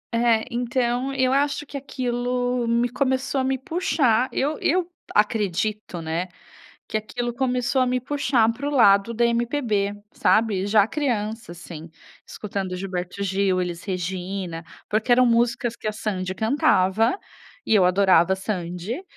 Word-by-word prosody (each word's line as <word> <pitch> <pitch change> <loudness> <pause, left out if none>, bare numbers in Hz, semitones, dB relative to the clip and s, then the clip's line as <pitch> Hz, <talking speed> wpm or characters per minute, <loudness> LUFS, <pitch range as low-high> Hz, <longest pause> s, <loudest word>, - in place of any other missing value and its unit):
É. 230 -1 +3
Então 245 +2 -1
eu 260 -1 +2
acho 285 +1 0
que 285 - -12
aquilo 245 -2 -2
me 235 +1 +2
começou 260 +1 0
a - - -1
me 265 0 0
puxar, 260 -5 +1
eu 295 +3 -1
eu 350 +2 +1 0.3
acredito, 210 -3 0
né, 165 +3 -2 0.6
que 215 - -1
aquilo 240 +3 -4
começou 250 +1 0
a 255 - +3
me 250 0 +1
puxar 250 -4 +1
para 270 +5 -4
o - - -2
lado 205 -4 +4
da 235 +1 +2
MPB, 235 -4 0 0.2
sabe. 215 -4 +2
Já 205 -1 +4
criança, 225 - -2
assim, 165 -2 -10 0.4
escutando 195 -3 -5
Gilberto 185 0 -4
Gil, 195 -1 +1
Elis 175 -1 -5
Regina, 185 -2 -4 0.3
porque 215 +3 0
eram 250 +1 +6
músicas 240 0 +1
que 225 - -5
a 215 - -1
Sandy 190 -4 -3
cantava, 220 - +2 0.5
e - - +2
eu 190 -4 +5
adorava 185 -1 +4
a - - -8
Sandy, 190 - -4
225 Hz, 145 wpm, -23 LUFS, 195-250 Hz, 0.6 s, eram